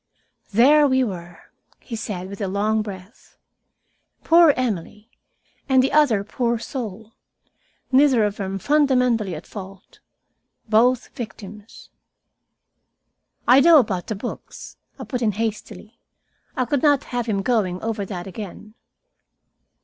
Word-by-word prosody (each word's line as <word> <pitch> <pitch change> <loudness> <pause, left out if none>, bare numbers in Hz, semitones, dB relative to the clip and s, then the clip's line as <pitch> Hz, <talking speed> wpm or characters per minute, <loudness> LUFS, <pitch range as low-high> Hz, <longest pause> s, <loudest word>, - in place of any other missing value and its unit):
"There 285 +8 +5
we 260 -1 +2
were," 175 -6 -8 0.3
he 235 - -8
said, 205 -4 -5
with 200 +2 -9
a 200 - -1
long 210 +3 0
breath. 200 +1 -11 0.9
"Poor 335 -1 +6
Emily, 215 -2 -4 0.6
and 260 -1 +4
the 270 - 0
other 260 -10 +3
poor 235 +2 -1
soul, 225 -3 -7 0.8
neither 265 -4 +4
of 205 0 -1
them 195 -2 -4
fundamentally 250 - +1
at 155 - -9
fault, 195 -2 -11 0.7
both 240 +3 +2
victims." 210 -1 -10 1.6
"I 255 +2 +7
know 325 +3 +7
about 195 -9 0
the 215 - -3
books," 225 +5 -8 0.2
I - - -7
put 250 -3 -4
in 215 -3 +1
hastily. 220 +1 -5 0.6
I 255 - +1
could 265 +2 -1
not 290 -3 +3
have 240 -1 -2
him 200 -3 -1
going 195 -6 0
over 220 -2 -2
that 185 -2 -6
again. 205 +2 -9
220 Hz, 125 wpm, -22 LUFS, 200-255 Hz, 1.6 s, I